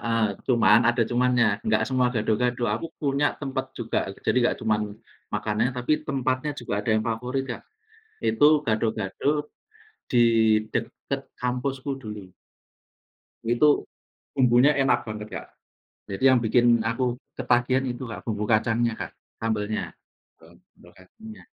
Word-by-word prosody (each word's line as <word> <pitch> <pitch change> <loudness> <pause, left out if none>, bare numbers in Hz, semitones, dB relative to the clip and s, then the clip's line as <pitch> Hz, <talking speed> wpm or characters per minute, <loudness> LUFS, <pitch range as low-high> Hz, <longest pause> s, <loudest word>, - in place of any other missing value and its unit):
heeh, 115 -1 +1 0.2
cuman 115 -3 +5
ada 120 0 +3
cumannya, 125 -1 +2 0.2
enggak 110 0 +2
semua 130 -1 +2
gado-gado. 120 +2 0
Aku 120 - -4
punya 140 0 0
tempat 135 -1 -3
juga, 115 -1 -1 0.3
jadi - - +2
enggak 120 - +2
cuman 110 -1 +2 0.5
makanannya 110 +4 0
tapi 125 +4 0 0.2
tempatnya 130 0 -1
juga 120 -5 -6
ada 110 - -7
yang 110 - +1
favorit, 125 +4 -2
Kak. - - -9 0.6
Itu 150 -7 +4
gado-gado, 110 +7 -1 0.6
di 120 -1 +4 0.5
dekat - - -3 0.2
kampusku 130 +2 -2
dulu. 105 -5 -7 1.2
Itu, 120 +6 +2 0.5
bumbunya 130 +3 +5
enak 135 -1 +3
banget, 105 -1 -7
Kak. - - -6 0.6
Jadi 100 +2 -7
yang 130 -1 +5
bikin 120 0 +3
aku 120 +2 0 0.2
ketagihan 125 +1 +1
itu, 120 +1 -5
Kak, 115 - -7
bumbu 105 -2 -3
kacangnya, 115 +1 +2
Kak, - - -6 0.3
sambelnya. 110 -1 -2 0.5
Eee, - - -18 0.2
lokasinya 150 - -14
120 Hz, 130 wpm, -25 LUFS, 110-130 Hz, 1.2 s, cuman